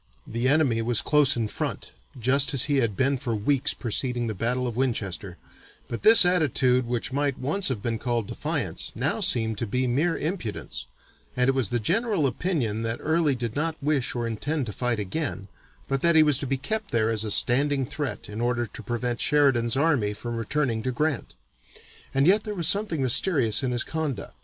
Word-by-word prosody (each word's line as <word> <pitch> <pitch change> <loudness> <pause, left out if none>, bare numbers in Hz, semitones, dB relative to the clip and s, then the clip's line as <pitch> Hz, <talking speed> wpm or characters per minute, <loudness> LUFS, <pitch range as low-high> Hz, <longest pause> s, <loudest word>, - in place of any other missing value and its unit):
The 120 +3 -2
enemy 135 -5 +2
was 115 -1 +2
close 145 -4 +3
in 115 -2 -1
front, - - -5 0.3
just 135 +4 +2
as 125 - +6
he 145 -1 +1
had 115 -7 0
been 135 +1 +1
for 120 -2 -3
weeks 130 +6 0
preceding 120 +1 -1
the 110 - -2
battle 120 +5 -1
of 120 -3 -4
Winchester, 100 -7 -2 0.5
but 115 - -5
this 220 -3 +8
attitude 130 -8 +2
which 120 +1 -2
might 140 -1 0
once 165 +9 -1
have 115 -6 -3
been 115 -2 -2
called 120 -3 -1
defiance, - - -4
now - - -1
seemed 110 -3 +2
to 120 - -2
be 125 +5 -1
mere 145 +8 0
impudence, 145 - -5 0.5
and 125 0 +3
it - - +3
was 130 -7 0
the 120 - 0
general 195 - +1
opinion 130 - -1
that 115 +1 -2
Early 160 -2 +1
did 120 -2 -4
not 160 +2 -1
wish 140 -4 -1
or 120 -1 -2
intend 135 +6 -2
to 105 - -6
fight 125 0 -1
again, 105 0 -4 0.4
but 135 -1 -1
that 170 -1 +3
he 160 - +7
was 150 -3 +2
to 140 - -4
be 135 +1 -1
kept 215 +9 -4
there 115 -1 +1
as 110 -1 0
a 110 - -4
standing 135 +5 +3
threat 145 +1 -5
in 105 +2 -6
order 120 0 0
to 120 +2 -10
prevent 120 +1 -3
Sheridan's 135 -5 +2
army 135 -9 +1
from 120 +3 -5
returning 115 0 -1
to 130 - -2
Grant. 140 - -2 0.8
And 135 +1 +2
yet 205 +5 +4
there 210 -1 -5
was 170 -4 0
something 200 -8 +2
mysterious 130 - +3
in 130 - -1
his 120 -1 0
conduct. 155 -8 -4
130 Hz, 200 wpm, -25 LUFS, 115-150 Hz, 0.8 s, this